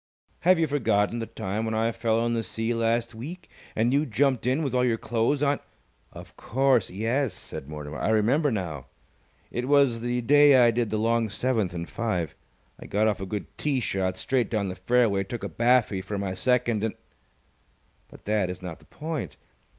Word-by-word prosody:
"Have 185 +1 +4
you 165 - +2
forgotten 120 -6 +1
the 115 - -4
time 100 +4 -3
when 110 0 -2
I 115 +1 +1
fell 115 0 0
in 120 - 0
the 115 - 0
sea 115 +1 -2
last 115 0 0
week, 155 +11 -9 0.2
and 115 +3 +2
you 145 +2 +2
jumped 130 0 +1
in 135 +5 +1
with 135 -4 -2
all 125 0 +2
your 120 -2 +2
clothes 120 +6 0
on 145 0 +2 0.3
" - - -40
"Of - - -12
course, 130 -2 +1
yes," 115 +4 -1
said 70 - -8
Mortimer. 75 -2 -7
"I 75 - 0
remember 120 +8 +3
now. 85 - -4 0.6
It 125 +1 -3
was 140 -5 +3
the 120 +1 -1
day 145 +3 +6
I 120 -2 +6
did 115 -1 -1
the 110 - -1
long 115 +1 +1
seventh 105 -4 -1
in 85 0 -3
five. 90 -9 -2 0.5
I - - -10
got 105 +2 +1
off 105 -2 0
a 95 - -4
good 105 +1 -5
tee 145 -3 0
shot 95 -5 -1
straight 125 0 0
down 105 -4 -1
the 90 - -5
fairway, 100 0 +2
took 115 +4 -6
a - - -1
baffy 120 -5 +2
for 100 +2 -5
my 100 -2 -2
second, 120 +1 +1
and 110 - -1 1.1
But - - -16
that 105 -3 +1
is 90 0 -7
not 90 -3 -6
the - - -21
point. 155 -3 -5
115 Hz, 200 wpm, -26 LUFS, 100-125 Hz, 1.1 s, day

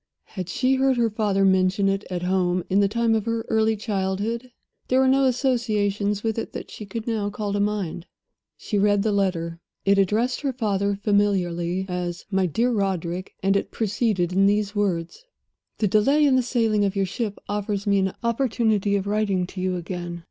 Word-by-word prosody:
Had 185 -3 -5
she 255 +7 +1
heard 265 -1 +2
her 230 -2 +2
father 205 -2 +1
mention 190 +1 +3
it 195 +1 0
at 180 -1 -3
home 180 -1 +1
in 195 - +4
the 200 - +4
time 230 +2 +1
of 220 0 0
her 230 0 -1
early 220 0 +2
childhood? 210 +3 -2 0.4
There 255 - +3
were 265 - +4
no 270 +1 +4
associations 210 -6 0
with 225 0 -1
it - - -6
that - - -7
she 210 - -8
could 220 +3 -5
now 215 -3 -1
call 205 0 -4
to 205 - 0
mind. 200 -5 -2 0.5
She 210 - -2
read 205 0 +3
the 215 - +1
letter. 170 -4 -1 0.3
It 200 0 +4
addressed 220 +6 +1
her 275 -3 -1
father 200 -4 0
familiarly 190 -3 +1
as 180 -1 -4
"My 190 -1 +2
dear 235 +9 +1
Roderick," 185 -4 -2
and 195 +1 +3
it 200 - 0
proceeded 205 -5 0
in 195 +1 +4
these 205 0 +1
words: 190 - -1 0.5
"The 215 - +1
delay 275 +10 +3
in 275 -2 +4
the 255 - +4
sailing 225 -4 +1
of 200 0 0
your 195 -1 +1
ship 205 +2 -4
offers 205 0 -2
me 200 -1 +3
an 190 -1 -1
opportunity 225 -4 +1
of 195 -1 -1
writing 200 -3 0
to 185 +1 -7
you 185 0 0
again. 175 -1 -5
205 Hz, 190 wpm, -24 LUFS, 190-225 Hz, 0.5 s, in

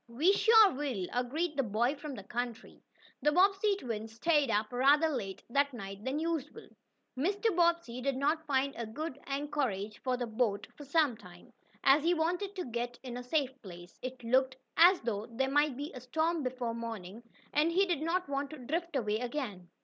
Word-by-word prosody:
"We 295 +12 +3
sure 440 -1 +7
will," 260 -9 -2
agreed 295 +7 -1
the 275 - +2
boy 235 +3 +1
from 290 -1 -7
the 200 - -8
country. 240 +2 -5 0.4
The 295 - +3
Bobbsey 390 +4 +4
twins 225 - -5
stayed 295 +2 +2
up 215 +2 0
rather 285 +6 +4
later 195 -10 -4
that 280 0 +2
night 195 -2 -7
than 265 +4 -1
usual. 325 - -3 0.5
Mr. 395 - 0
Bobbsey 340 -8 +1
did 275 0 -1
not 310 +3 0
find 275 0 +1
a 230 -1 -4
good 285 +4 -5
anchorage 275 -8 -2
for 255 -1 0
the 245 - -2
boat 220 -3 0
for 290 - -10
some 285 -3 +2
time, 180 -5 -15 0.3
as 275 +3 +6
he 345 +2 +3
wanted 360 +5 -1
to 365 - -3
get 240 0 -4
in 250 -2 -6
a 250 - -4
safe 265 +1 0
place. 175 -1 -12
It 255 -1 -6
looked 260 +2 +2 0.2
as 355 +3 +7
though 220 -2 -3
there 265 +3 -1
might 290 -2 +2
be 290 +2 -5
a 255 - -8
storm 320 +6 0
before 250 -3 -3
morning, 225 -3 -6 0.3
and 305 +3 +3
he 380 +4 +3
did 345 -6 -1
not 350 +3 0
want 280 0 -2
to 310 - -9
drift 320 +6 -3
away 215 -4 0
again. 235 - -4
270 Hz, 190 wpm, -32 LUFS, 235-315 Hz, 0.5 s, sure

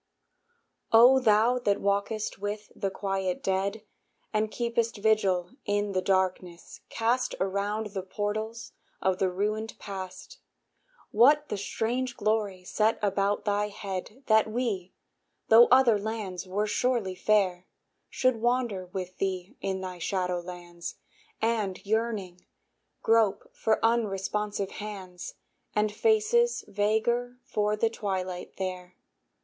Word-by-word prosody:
O 245 +4 +8
thou 230 +1 +4
that 205 -4 +1
walkest 200 +2 -1
with 205 +1 -4
the 195 - -1
quiet 195 -1 -2
dead, 195 +3 -1 0.5
And 215 0 +1
keepest 235 0 -1
vigil 200 -4 +2
in 205 0 0
the 185 -1 0
darkness 185 -2 -1
cast 240 +3 0
Around 200 +2 -1
the 195 - -2
portals 215 +4 -4 0.3
of 190 -1 0
the 190 - +2
ruined 215 +4 -2
past, 195 - -8 0.7
What 290 +7 +5
the - - -1
strange 240 +5 -2
glory 205 -3 0
set 215 +4 +1
about 200 0 +1
thy 205 0 +1
head, 200 +5 -6
That 220 -1 +4
we, 215 -6 -2 0.5
tho' 230 +2 +9
other 245 -4 +6
lands 200 -4 -4
were 200 +3 0
surely 225 -3 0
fair, 185 -2 +1 0.4
Should 255 -2 +1
wander 240 -6 0
with 185 0 -6
thee 185 -1 -2
in 190 -1 -2
thy 185 -1 -6
shadow 180 0 -1
lands, 175 -1 -8 0.5
And, 215 -5 0
yearning, 210 -4 -2 0.6
grope 225 -3 +2
for 220 - +1
unresponsive 210 -3 0
hands, 190 -4 -7 0.4
And 210 0 +2
faces 450 - +2
vaguer 230 +4 0
for 210 -5 0
the 225 +1 +1
twilight 185 -4 -4
there? 185 -1 -5
205 Hz, 120 wpm, -28 LUFS, 190-225 Hz, 0.7 s, tho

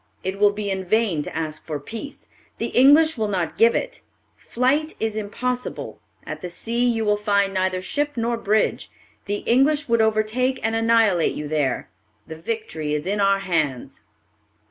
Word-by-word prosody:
It 190 +1 -3
will 205 0 +6
be 205 -1 -3
in 190 0 -2
vain 200 -4 +1
to - - -7
ask 155 -1 -4
for 150 -3 -4
peace; 230 - -8 0.3
the - - -2
English 290 +3 +5
will 215 - +1
not 180 -5 -2
give 230 +1 +4
it. - - -3 0.3
Flight 285 +6 0
is 220 -1 -1
impossible; 250 +4 -4 0.2
at - - -6
the 180 - -5
sea 230 +7 -1
you 225 -2 0
will 210 0 +2
find 200 -2 +1
neither 185 -1 -1
ship 290 +9 -1
nor 235 +1 0
bridge; 215 -1 0 0.4
the 205 0 -3
English 285 +4 +3
would 230 -1 +3
overtake 220 +4 +1
and 225 +1 0
annihilate 225 -6 +3
you 150 - -5
there. 145 -4 -1 0.3
The 160 - -8
victory 160 -5 -3
is 150 - -3
in 200 +2 -1
our 195 0 +3
hands." 155 -9 -2
215 Hz, 170 wpm, -23 LUFS, 185-235 Hz, 0.4 s, will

